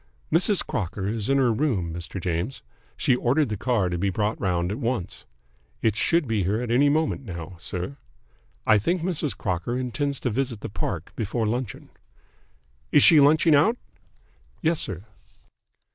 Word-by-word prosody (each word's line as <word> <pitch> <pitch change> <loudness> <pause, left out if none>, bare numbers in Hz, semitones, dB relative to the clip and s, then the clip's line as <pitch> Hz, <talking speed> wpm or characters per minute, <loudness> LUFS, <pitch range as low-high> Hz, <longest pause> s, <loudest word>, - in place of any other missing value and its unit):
"Mrs. 185 +4 +3
Crocker 95 -2 -3
is 110 +1 -2
in 135 - +3
her 125 -4 +3
room, 105 - 0
Mr. 85 +3 -5
James. 90 +8 -3 0.3
She 125 - +3
ordered 130 +3 +1
the 105 - -2
car 110 -2 +1
to 90 -1 -2
be 100 +2 +1
brought 105 +3 -1
round 90 -1 0
at 110 - -4
once. 115 -8 -3 0.6
It 110 -3 +2
should 165 +5 +2
be 110 -3 0
here 100 +5 0
at 120 -1 -3
any 140 +4 +4
moment 155 -1 0
now, 85 -5 -7
sir. 90 +10 -5 0.7
I 110 -1 +5
think 170 - 0
Mrs. 165 -5 -2
Crocker 95 +5 -2
intends 135 +2 -2
to 125 - -1
visit 120 -2 -2
the - - -5
Park 90 -4 -4
before 110 +1 -1
luncheon." 120 +1 -3 1.0
"Is - - +6
she 160 - +8
lunching 155 +3 +5
out?" 190 +12 +4 0.9
"Yes, 165 0 +2
sir." 95 +1 -4
115 Hz, 165 wpm, -25 LUFS, 95-140 Hz, 1.0 s, she